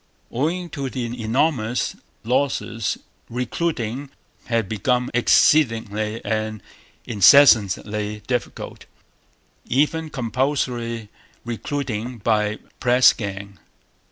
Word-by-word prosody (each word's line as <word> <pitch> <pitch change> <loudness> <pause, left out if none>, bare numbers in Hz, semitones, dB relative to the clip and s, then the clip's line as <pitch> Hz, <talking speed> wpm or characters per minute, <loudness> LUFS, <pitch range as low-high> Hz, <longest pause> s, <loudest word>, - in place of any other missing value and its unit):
Owing 165 +7 -2
to 140 -3 -4
the 125 -2 -3 0.2
enormous 120 0 0 0.3
losses 120 -3 -1 0.3
recruiting 125 +1 -3 0.4
had 115 -4 0
become 125 +4 0
exceedingly 115 -4 +2
and 110 -2 -2 0.4
increasingly 105 -2 +4
difficult, 125 -2 -4 0.8
even 155 +4 +1
compulsory 120 -4 -2 0.4
recruiting 120 -1 -4
by 105 -1 +1 0.2
press 125 0 +5
gang. 100 -3 -7
120 Hz, 75 wpm, -22 LUFS, 110-135 Hz, 0.8 s, press